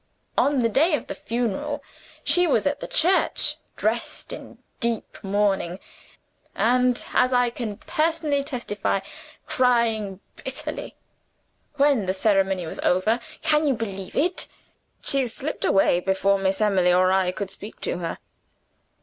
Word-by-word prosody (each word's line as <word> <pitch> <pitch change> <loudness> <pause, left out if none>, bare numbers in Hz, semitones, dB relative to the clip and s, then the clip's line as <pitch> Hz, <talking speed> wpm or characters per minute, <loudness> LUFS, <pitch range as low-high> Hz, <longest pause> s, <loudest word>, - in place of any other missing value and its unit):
On 275 -3 +2
the - - +4
day 300 - +3
of - - -5
the - - -5
funeral, 245 +5 -2
there 280 - -24
she 355 0 +3
was 230 -8 +2
at 285 0 0
the - - -6
church, 365 +4 +2 0.2
dressed - - -2
in - - -10 0.2
deep 235 -2 -2
mourning; 195 -3 0 0.8
and, 250 +1 +2
as 255 - +3
I 245 -1 +3
can 225 -4 -5
personally 310 -3 0
testify, 210 -7 -2 0.4
crying 225 -6 +1 0.2
bitterly. - - -4 0.8
When 280 -8 +3
the 185 - 0
ceremony 195 -3 +2
was 160 - -7
over 215 +6 +2 0.2
can 305 0 +3
you 270 - +2
believe 195 -4 -5
it? 355 +5 +1 0.6
she 275 -2 +2
slipped 275 +6 -3
away 195 -2 +4
before 195 +1 +1
Miss 195 +1 0
Emily 190 -4 +3
or 185 +1 +4
I 190 -1 +2
could 195 +1 -5
speak 210 - -10
to 175 - -2
her. 165 -2 -4
225 Hz, 140 wpm, -24 LUFS, 195-275 Hz, 0.8 s, the